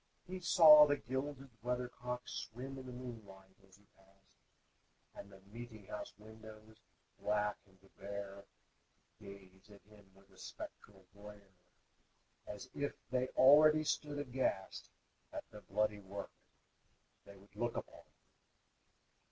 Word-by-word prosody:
He 185 +1 -6
saw 155 -4 +9
the 145 0 +2
gilded 135 +1 -4
weathercock 125 0 -3
Swim 130 +4 -6
in 130 - -9
the - - -7
moonlight 105 -7 -10
as 95 - -20
he 100 +1 -24
passed, 95 0 -27 0.7
And 100 - -11
the 95 0 -15
meeting 110 +1 -10
house 105 - -6
windows, 110 0 -14 0.4
blank 105 0 0
and 95 -1 -24 0.2
bare, 100 0 -7 0.7
Gaze 100 -1 -13
at 100 -1 -16
him 105 -2 -19
with 95 0 -22
a 95 - -19
spectral 95 -2 -10
glare, 100 -1 -13 0.9
As 105 +5 -7
if 145 0 -2 0.2
they 130 0 +1
already 150 +3 +7
stood 145 -1 -1
aghast 130 -8 -2 0.4
At - - -5
the 105 - -11
bloody 105 +1 0
work 100 0 -7 0.9
they 100 - -13
would 100 +1 -20
look 120 0 -2
upon. - - -7
105 Hz, 125 wpm, -36 LUFS, 100-130 Hz, 0.9 s, saw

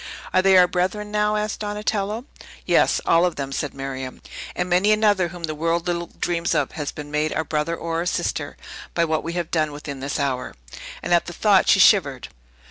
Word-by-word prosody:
"Are 185 - +5
they 190 0 +5
our 180 -1 +7
brethren, 190 +4 -2
now?" 210 0 +1
asked 210 0 -2
Donatello. 210 +2 -2 0.4
"Yes; - - +3
all 165 +1 +4
of 180 -1 +1
them," 135 -1 -4
said 140 +1 -3
Miriam, 130 -1 -6 0.4
"and 180 - -1
many 185 +4 +3
another, 210 -4 +3
whom 175 0 -10
the 155 -1 -2
world 165 +2 -1
little 170 -1 -2
dreams 170 -1 0
of, 145 -3 0
has 150 -3 -4
been 145 -1 -9
made 150 +1 0
our 160 - 0
brother 155 +2 -1
or 165 0 -3
our 175 - -2
sister, - - -2 0.4
by 170 - +3
what 155 -1 0
we 165 - -4
have 175 -2 -3
done 155 -2 +1
within 145 -1 -7
this 140 +3 -3
hour!" 130 -3 -2 0.5
And 175 - 0
at 170 - +3
the 175 - -6
thought 200 +1 +3
she 195 - +6
shivered. 145 - +4
170 Hz, 210 wpm, -23 LUFS, 150-190 Hz, 0.5 s, our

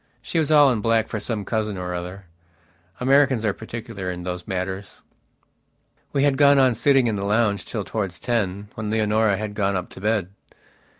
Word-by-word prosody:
She 165 - -1
was 155 -2 0
all 145 -3 +6
in 115 -4 -1
black 115 0 +2
for 110 - -3
some 105 -2 -3
cousin 110 -3 -2
or 90 -1 -4
other. 90 +2 -6 0.7
Americans 135 -2 +3
are 105 - +1
particular 110 -4 -6
in 90 -1 -5
those 90 0 -5
matters. 95 +1 -4 1.1
We 140 - +1
had 140 -2 +3
gone 140 -1 +6
on 130 -2 +5
sitting 130 +3 +3
in 110 -3 0
the 100 - -3
lounge 105 0 +1
till 105 -3 -4
towards 95 -4 -3
ten, 105 -4 -2
when 110 -1 -5
Leonora 110 -1 +2
had 105 0 -4
gone 100 -2 0
up 90 -1 -3
to - - -11
bed. 105 -3 0
110 Hz, 185 wpm, -23 LUFS, 95-120 Hz, 1.1 s, all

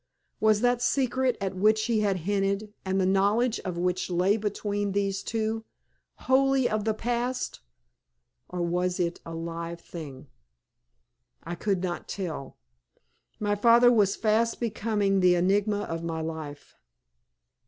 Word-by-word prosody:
Was 215 -1 +3
that 245 0 +2
secret 260 -1 +1
at 195 -1 -3
which 215 +3 +3
he 230 -3 +1
had 200 -3 +1
hinted, 200 +1 0
and 190 0 0
the 185 - +2
knowledge 205 +5 +2
of 180 -3 -5
which 180 +1 -1
lay 180 +3 +2
between 205 -1 -2
these 195 -1 0
two, 225 0 -2 0.6
wholly 265 0 +3
of 215 -1 -1
the 220 -1 +1
past, 245 +3 -2 0.9
or 180 -1 -3
was 180 +2 0
it 170 -1 -1
a 165 - -6
live 170 +1 -5
thing? 150 -6 -9 1.2
I - - -5
could 190 0 -1
not 175 -1 -3
tell. 170 -8 -5 0.8
My 205 -1 0
father 235 +3 +6
was 205 -4 +3
fast 225 +1 +1
becoming 210 -3 0
the 180 -1 +5
enigma 200 +3 +2
of 165 -4 -4
my 165 -1 -3
life. 160 -3 -7
200 Hz, 140 wpm, -27 LUFS, 180-220 Hz, 1.2 s, father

